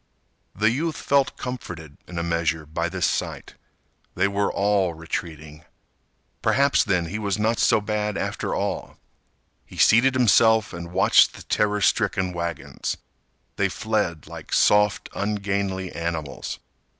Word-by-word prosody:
The 110 +3 +3
youth 155 +5 -1
felt 140 -1 +1
comforted 85 - -7
in 90 - -8
a 85 - -1
measure 85 -2 -1
by 85 +3 -2
this 90 0 -1
sight. - - -3 0.6
They 95 +2 +2
were 100 0 0
all 100 -4 +1
retreating. 80 -2 -6 0.8
Perhaps, 140 +1 +3
then, 90 -5 +1
he 100 +6 -4
was 100 -2 -1
not 110 +2 0
so - - +4
bad 105 -1 -2
after - - -2
all. - - -3 0.7
He - - -14
seated 130 +4 +5
himself 110 -3 +4
and 85 0 -7
watched 95 - +5
the - - -11
terror 105 0 0
stricken 95 -2 +1
wagons. 85 -1 -4 0.6
They 100 0 +2
fled 105 -7 -2
like - - -9
soft, 105 -1 +3
ungainly 100 -2 -2
animals. 80 -3 -4
100 Hz, 135 wpm, -24 LUFS, 85-105 Hz, 0.8 s, seated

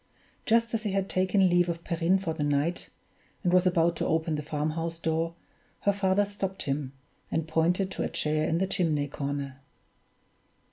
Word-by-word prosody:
Just 230 0 +3
as 225 - 0
he 210 -3 -2
had 195 -1 0
taken 185 +1 +3
leave 175 0 +3
of 170 0 -3
Perrine 170 +2 +2
for 185 -4 -3
the 160 - -5
night, 145 +4 0 0.5
and 180 -2 +2
was 185 0 +5
about 170 -1 +3
to - - -1
open 160 0 +1
the 150 - -1
farmhouse 155 +2 -2
door, 165 0 -1 0.5
her 200 - +3
father 200 0 +2
stopped 195 -1 -4
him, 140 -1 -2 0.4
and 160 -1 -1
pointed 175 +4 +1
to - - -4
a - - -1
chair 155 0 +1
in 165 - +1
the 190 - +2
chimney 160 -7 0
corner. 140 -1 -4
170 Hz, 180 wpm, -28 LUFS, 155-190 Hz, 0.5 s, was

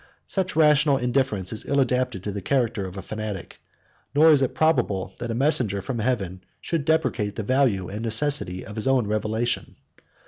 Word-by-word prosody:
Such 185 -3 -2
rational 150 -2 +4
indifference 125 -7 -1
is 110 - -3
ill 140 - +2
adapted 125 -6 0
to 105 - -3
the 100 0 -5
character 115 -4 0
of 95 +1 -9
a 95 - -6
fanatic; 110 -4 -6 0.5
nor 160 +2 +7
is 145 -3 +5
it 130 -1 0
probable 100 - +1
that 120 - -4
a 115 - -2
messenger 125 -7 +1
from 115 +5 -4
heaven 100 -6 -2 0.2
should 160 -4 -2
depreciate 115 -10 0
the 110 - -3
value 120 -7 +1
and 105 +3 -6
necessity 115 -5 +1
of 105 - -9
his 110 - -1
own 130 -4 +3
revelation. 110 +3 -2
120 Hz, 180 wpm, -24 LUFS, 105-140 Hz, 0.5 s, nor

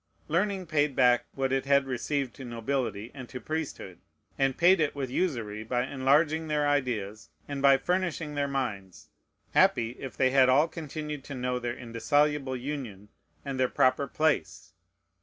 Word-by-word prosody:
Learning 190 +3 0
paid 150 -4 +1
back 125 -1 +4
what 135 -1 0
it 135 0 -1 0.2
received 135 0 -2
to 135 - -10
nobility 120 -2 -3
and 130 -3 -9
to 125 - -6
priesthood, 145 - -5 0.4
and 135 -1 +1
paid 180 +2 +5
it 150 -2 0
with 135 -3 -4
usury, 115 - -2
by 125 +2 -1
enlarging 145 +4 +2
their 150 -1 +1
ideas, 110 -8 -1 0.2
and 140 -1 -4
by 140 -1 +6
furnishing 170 -1 -1
their 145 -1 0
minds. 110 -10 -4 0.4
Happy, 115 -1 +3
if 135 - -7
they 130 -1 +3
had 130 -1 +5
all 145 +5 +5
continued 150 -3 -6
to 140 - -7
know 125 0 -2
their 120 0 -4
indissoluble 135 +3 0
union, 120 -7 -6 0.4
and 135 -2 -4
their 130 -1 +2
proper 130 +2 +2
place! 155 - -1
135 Hz, 160 wpm, -28 LUFS, 125-150 Hz, 0.4 s, by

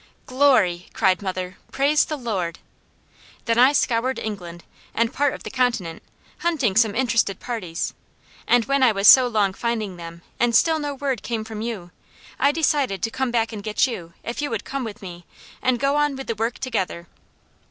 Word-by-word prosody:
'" - - -38
"Glory!" 250 -10 +3
cried 190 -3 +2
mother. 185 -1 -4
"Praise 285 +3 +3
the 305 - -4
Lord!" 190 -10 -3 0.9
"'Then 230 0 +1
I 255 +3 +7
scoured 255 -2 +1
England, 175 -5 -6 0.3
and 230 +2 +1
part 285 -1 +1
of - - -11
the - - -7
continent, 235 -10 -1 0.4
hunting 290 - 0
some 220 -2 +3
interested 230 -6 +1
parties; 190 -9 -4 0.5
and 240 -2 +4
when 275 0 +1
I 255 -3 +6
was 200 0 +2
so 255 +2 +9
long 210 -5 +1
finding 215 -4 -3
them, 170 0 -10 0.2
and 240 -1 +2
still 320 +5 +4
no 290 -1 -3
word 270 -4 -2
came 230 -2 -3
from 220 -1 -7
you, 215 -7 -5 0.5
I 280 +2 +4
decided 290 - 0
to 225 - 0
come 265 0 -1
back 230 -1 0
and 210 - -6
get 210 +1 +1
you, 175 -10 -6
if 235 +4 -4
you 290 - -2
would 225 -3 -4
come 275 -1 -4
with 220 -1 -8
me, 175 -2 -9 0.4
and 255 -1 +1
go 275 +1 +1
on 295 -1 +1
with 270 0 -6
the 230 - -2
work 225 +2 -2
together.'" 185 -9 -3
230 Hz, 190 wpm, -23 LUFS, 195-265 Hz, 0.9 s, so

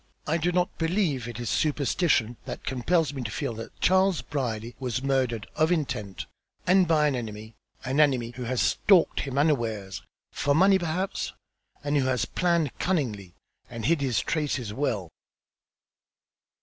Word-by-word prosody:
I 160 +2 +1
do 170 +2 0
not 180 0 0
believe 165 - 0
it 120 -1 -6
is 120 - -4
superstition 140 -5 +1
that - - -6
compels 145 +4 +1
me 135 - -4
to 115 - -4
feel 115 - -3
that 115 +1 -9
Charles 190 -2 +3
Brierly 120 -5 -3
was 130 -1 -2
murdered 130 -5 0
of 160 +2 +2
intent, 120 - -2 0.4
and 185 0 +4
by 155 -2 +3
an 145 -3 +2
enemy, 110 -2 -6 0.3
an 130 +3 0
enemy 130 -6 +3
who 125 0 -6
has 125 +1 0
stalked 190 -5 +3
him 135 -1 -3
unawares, 115 -10 0 0.3
for 140 0 +1
money 190 +3 +5
perhaps, 175 +3 -2 0.5
and 145 0 +1
who 135 - +2
has 125 -5 +1
planned 170 - 0
cunningly, 110 - -1 0.3
and 115 -2 -6
hid 165 -2 +2
his 125 -7 +1
traces 135 -8 -2
well." 105 - -2
135 Hz, 155 wpm, -27 LUFS, 120-160 Hz, 0.5 s, money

